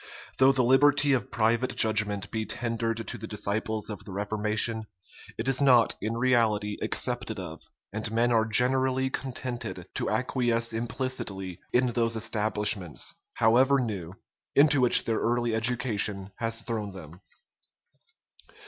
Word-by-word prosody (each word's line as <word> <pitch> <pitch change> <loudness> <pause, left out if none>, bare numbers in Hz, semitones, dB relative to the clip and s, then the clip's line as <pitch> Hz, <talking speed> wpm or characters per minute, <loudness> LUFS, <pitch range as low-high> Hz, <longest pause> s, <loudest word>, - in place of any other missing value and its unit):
Though 130 +1 +6
the 130 -2 +1
liberty 145 +3 +4
of 130 - -1
private 115 +3 0
judgment 105 -2 +2
be 110 -1 -2
tendered 115 -1 -3
to - - -5
the 110 - -7
disciples 105 +1 -3
of 105 - -8
the 100 - -10
reformation, 110 +2 -1 0.5
it 115 - -4
is 135 0 +1
not 125 -4 +5
in 110 +2 -3
reality 115 -4 +1
accepted - - -1
of; - - -8 0.3
and 110 0 -3
men 115 +2 +1
are 110 -1 +3
generally 130 +3 +1
contented 130 -2 -5
to - - -2
acquiesce 120 -3 0
implicitly 115 -6 -4
in 125 0 +2
those 115 -1 0
establishments, 105 -5 0 0.2
however 130 +5 +4
new, 100 -8 -4 0.4
into 145 -1 +5
which 125 - +6
their 115 -1 0
early 120 0 0
education 110 -4 +1
has 115 0 -2
thrown 105 -4 -4
them. 85 -1 -12
115 Hz, 135 wpm, -27 LUFS, 105-125 Hz, 0.5 s, Though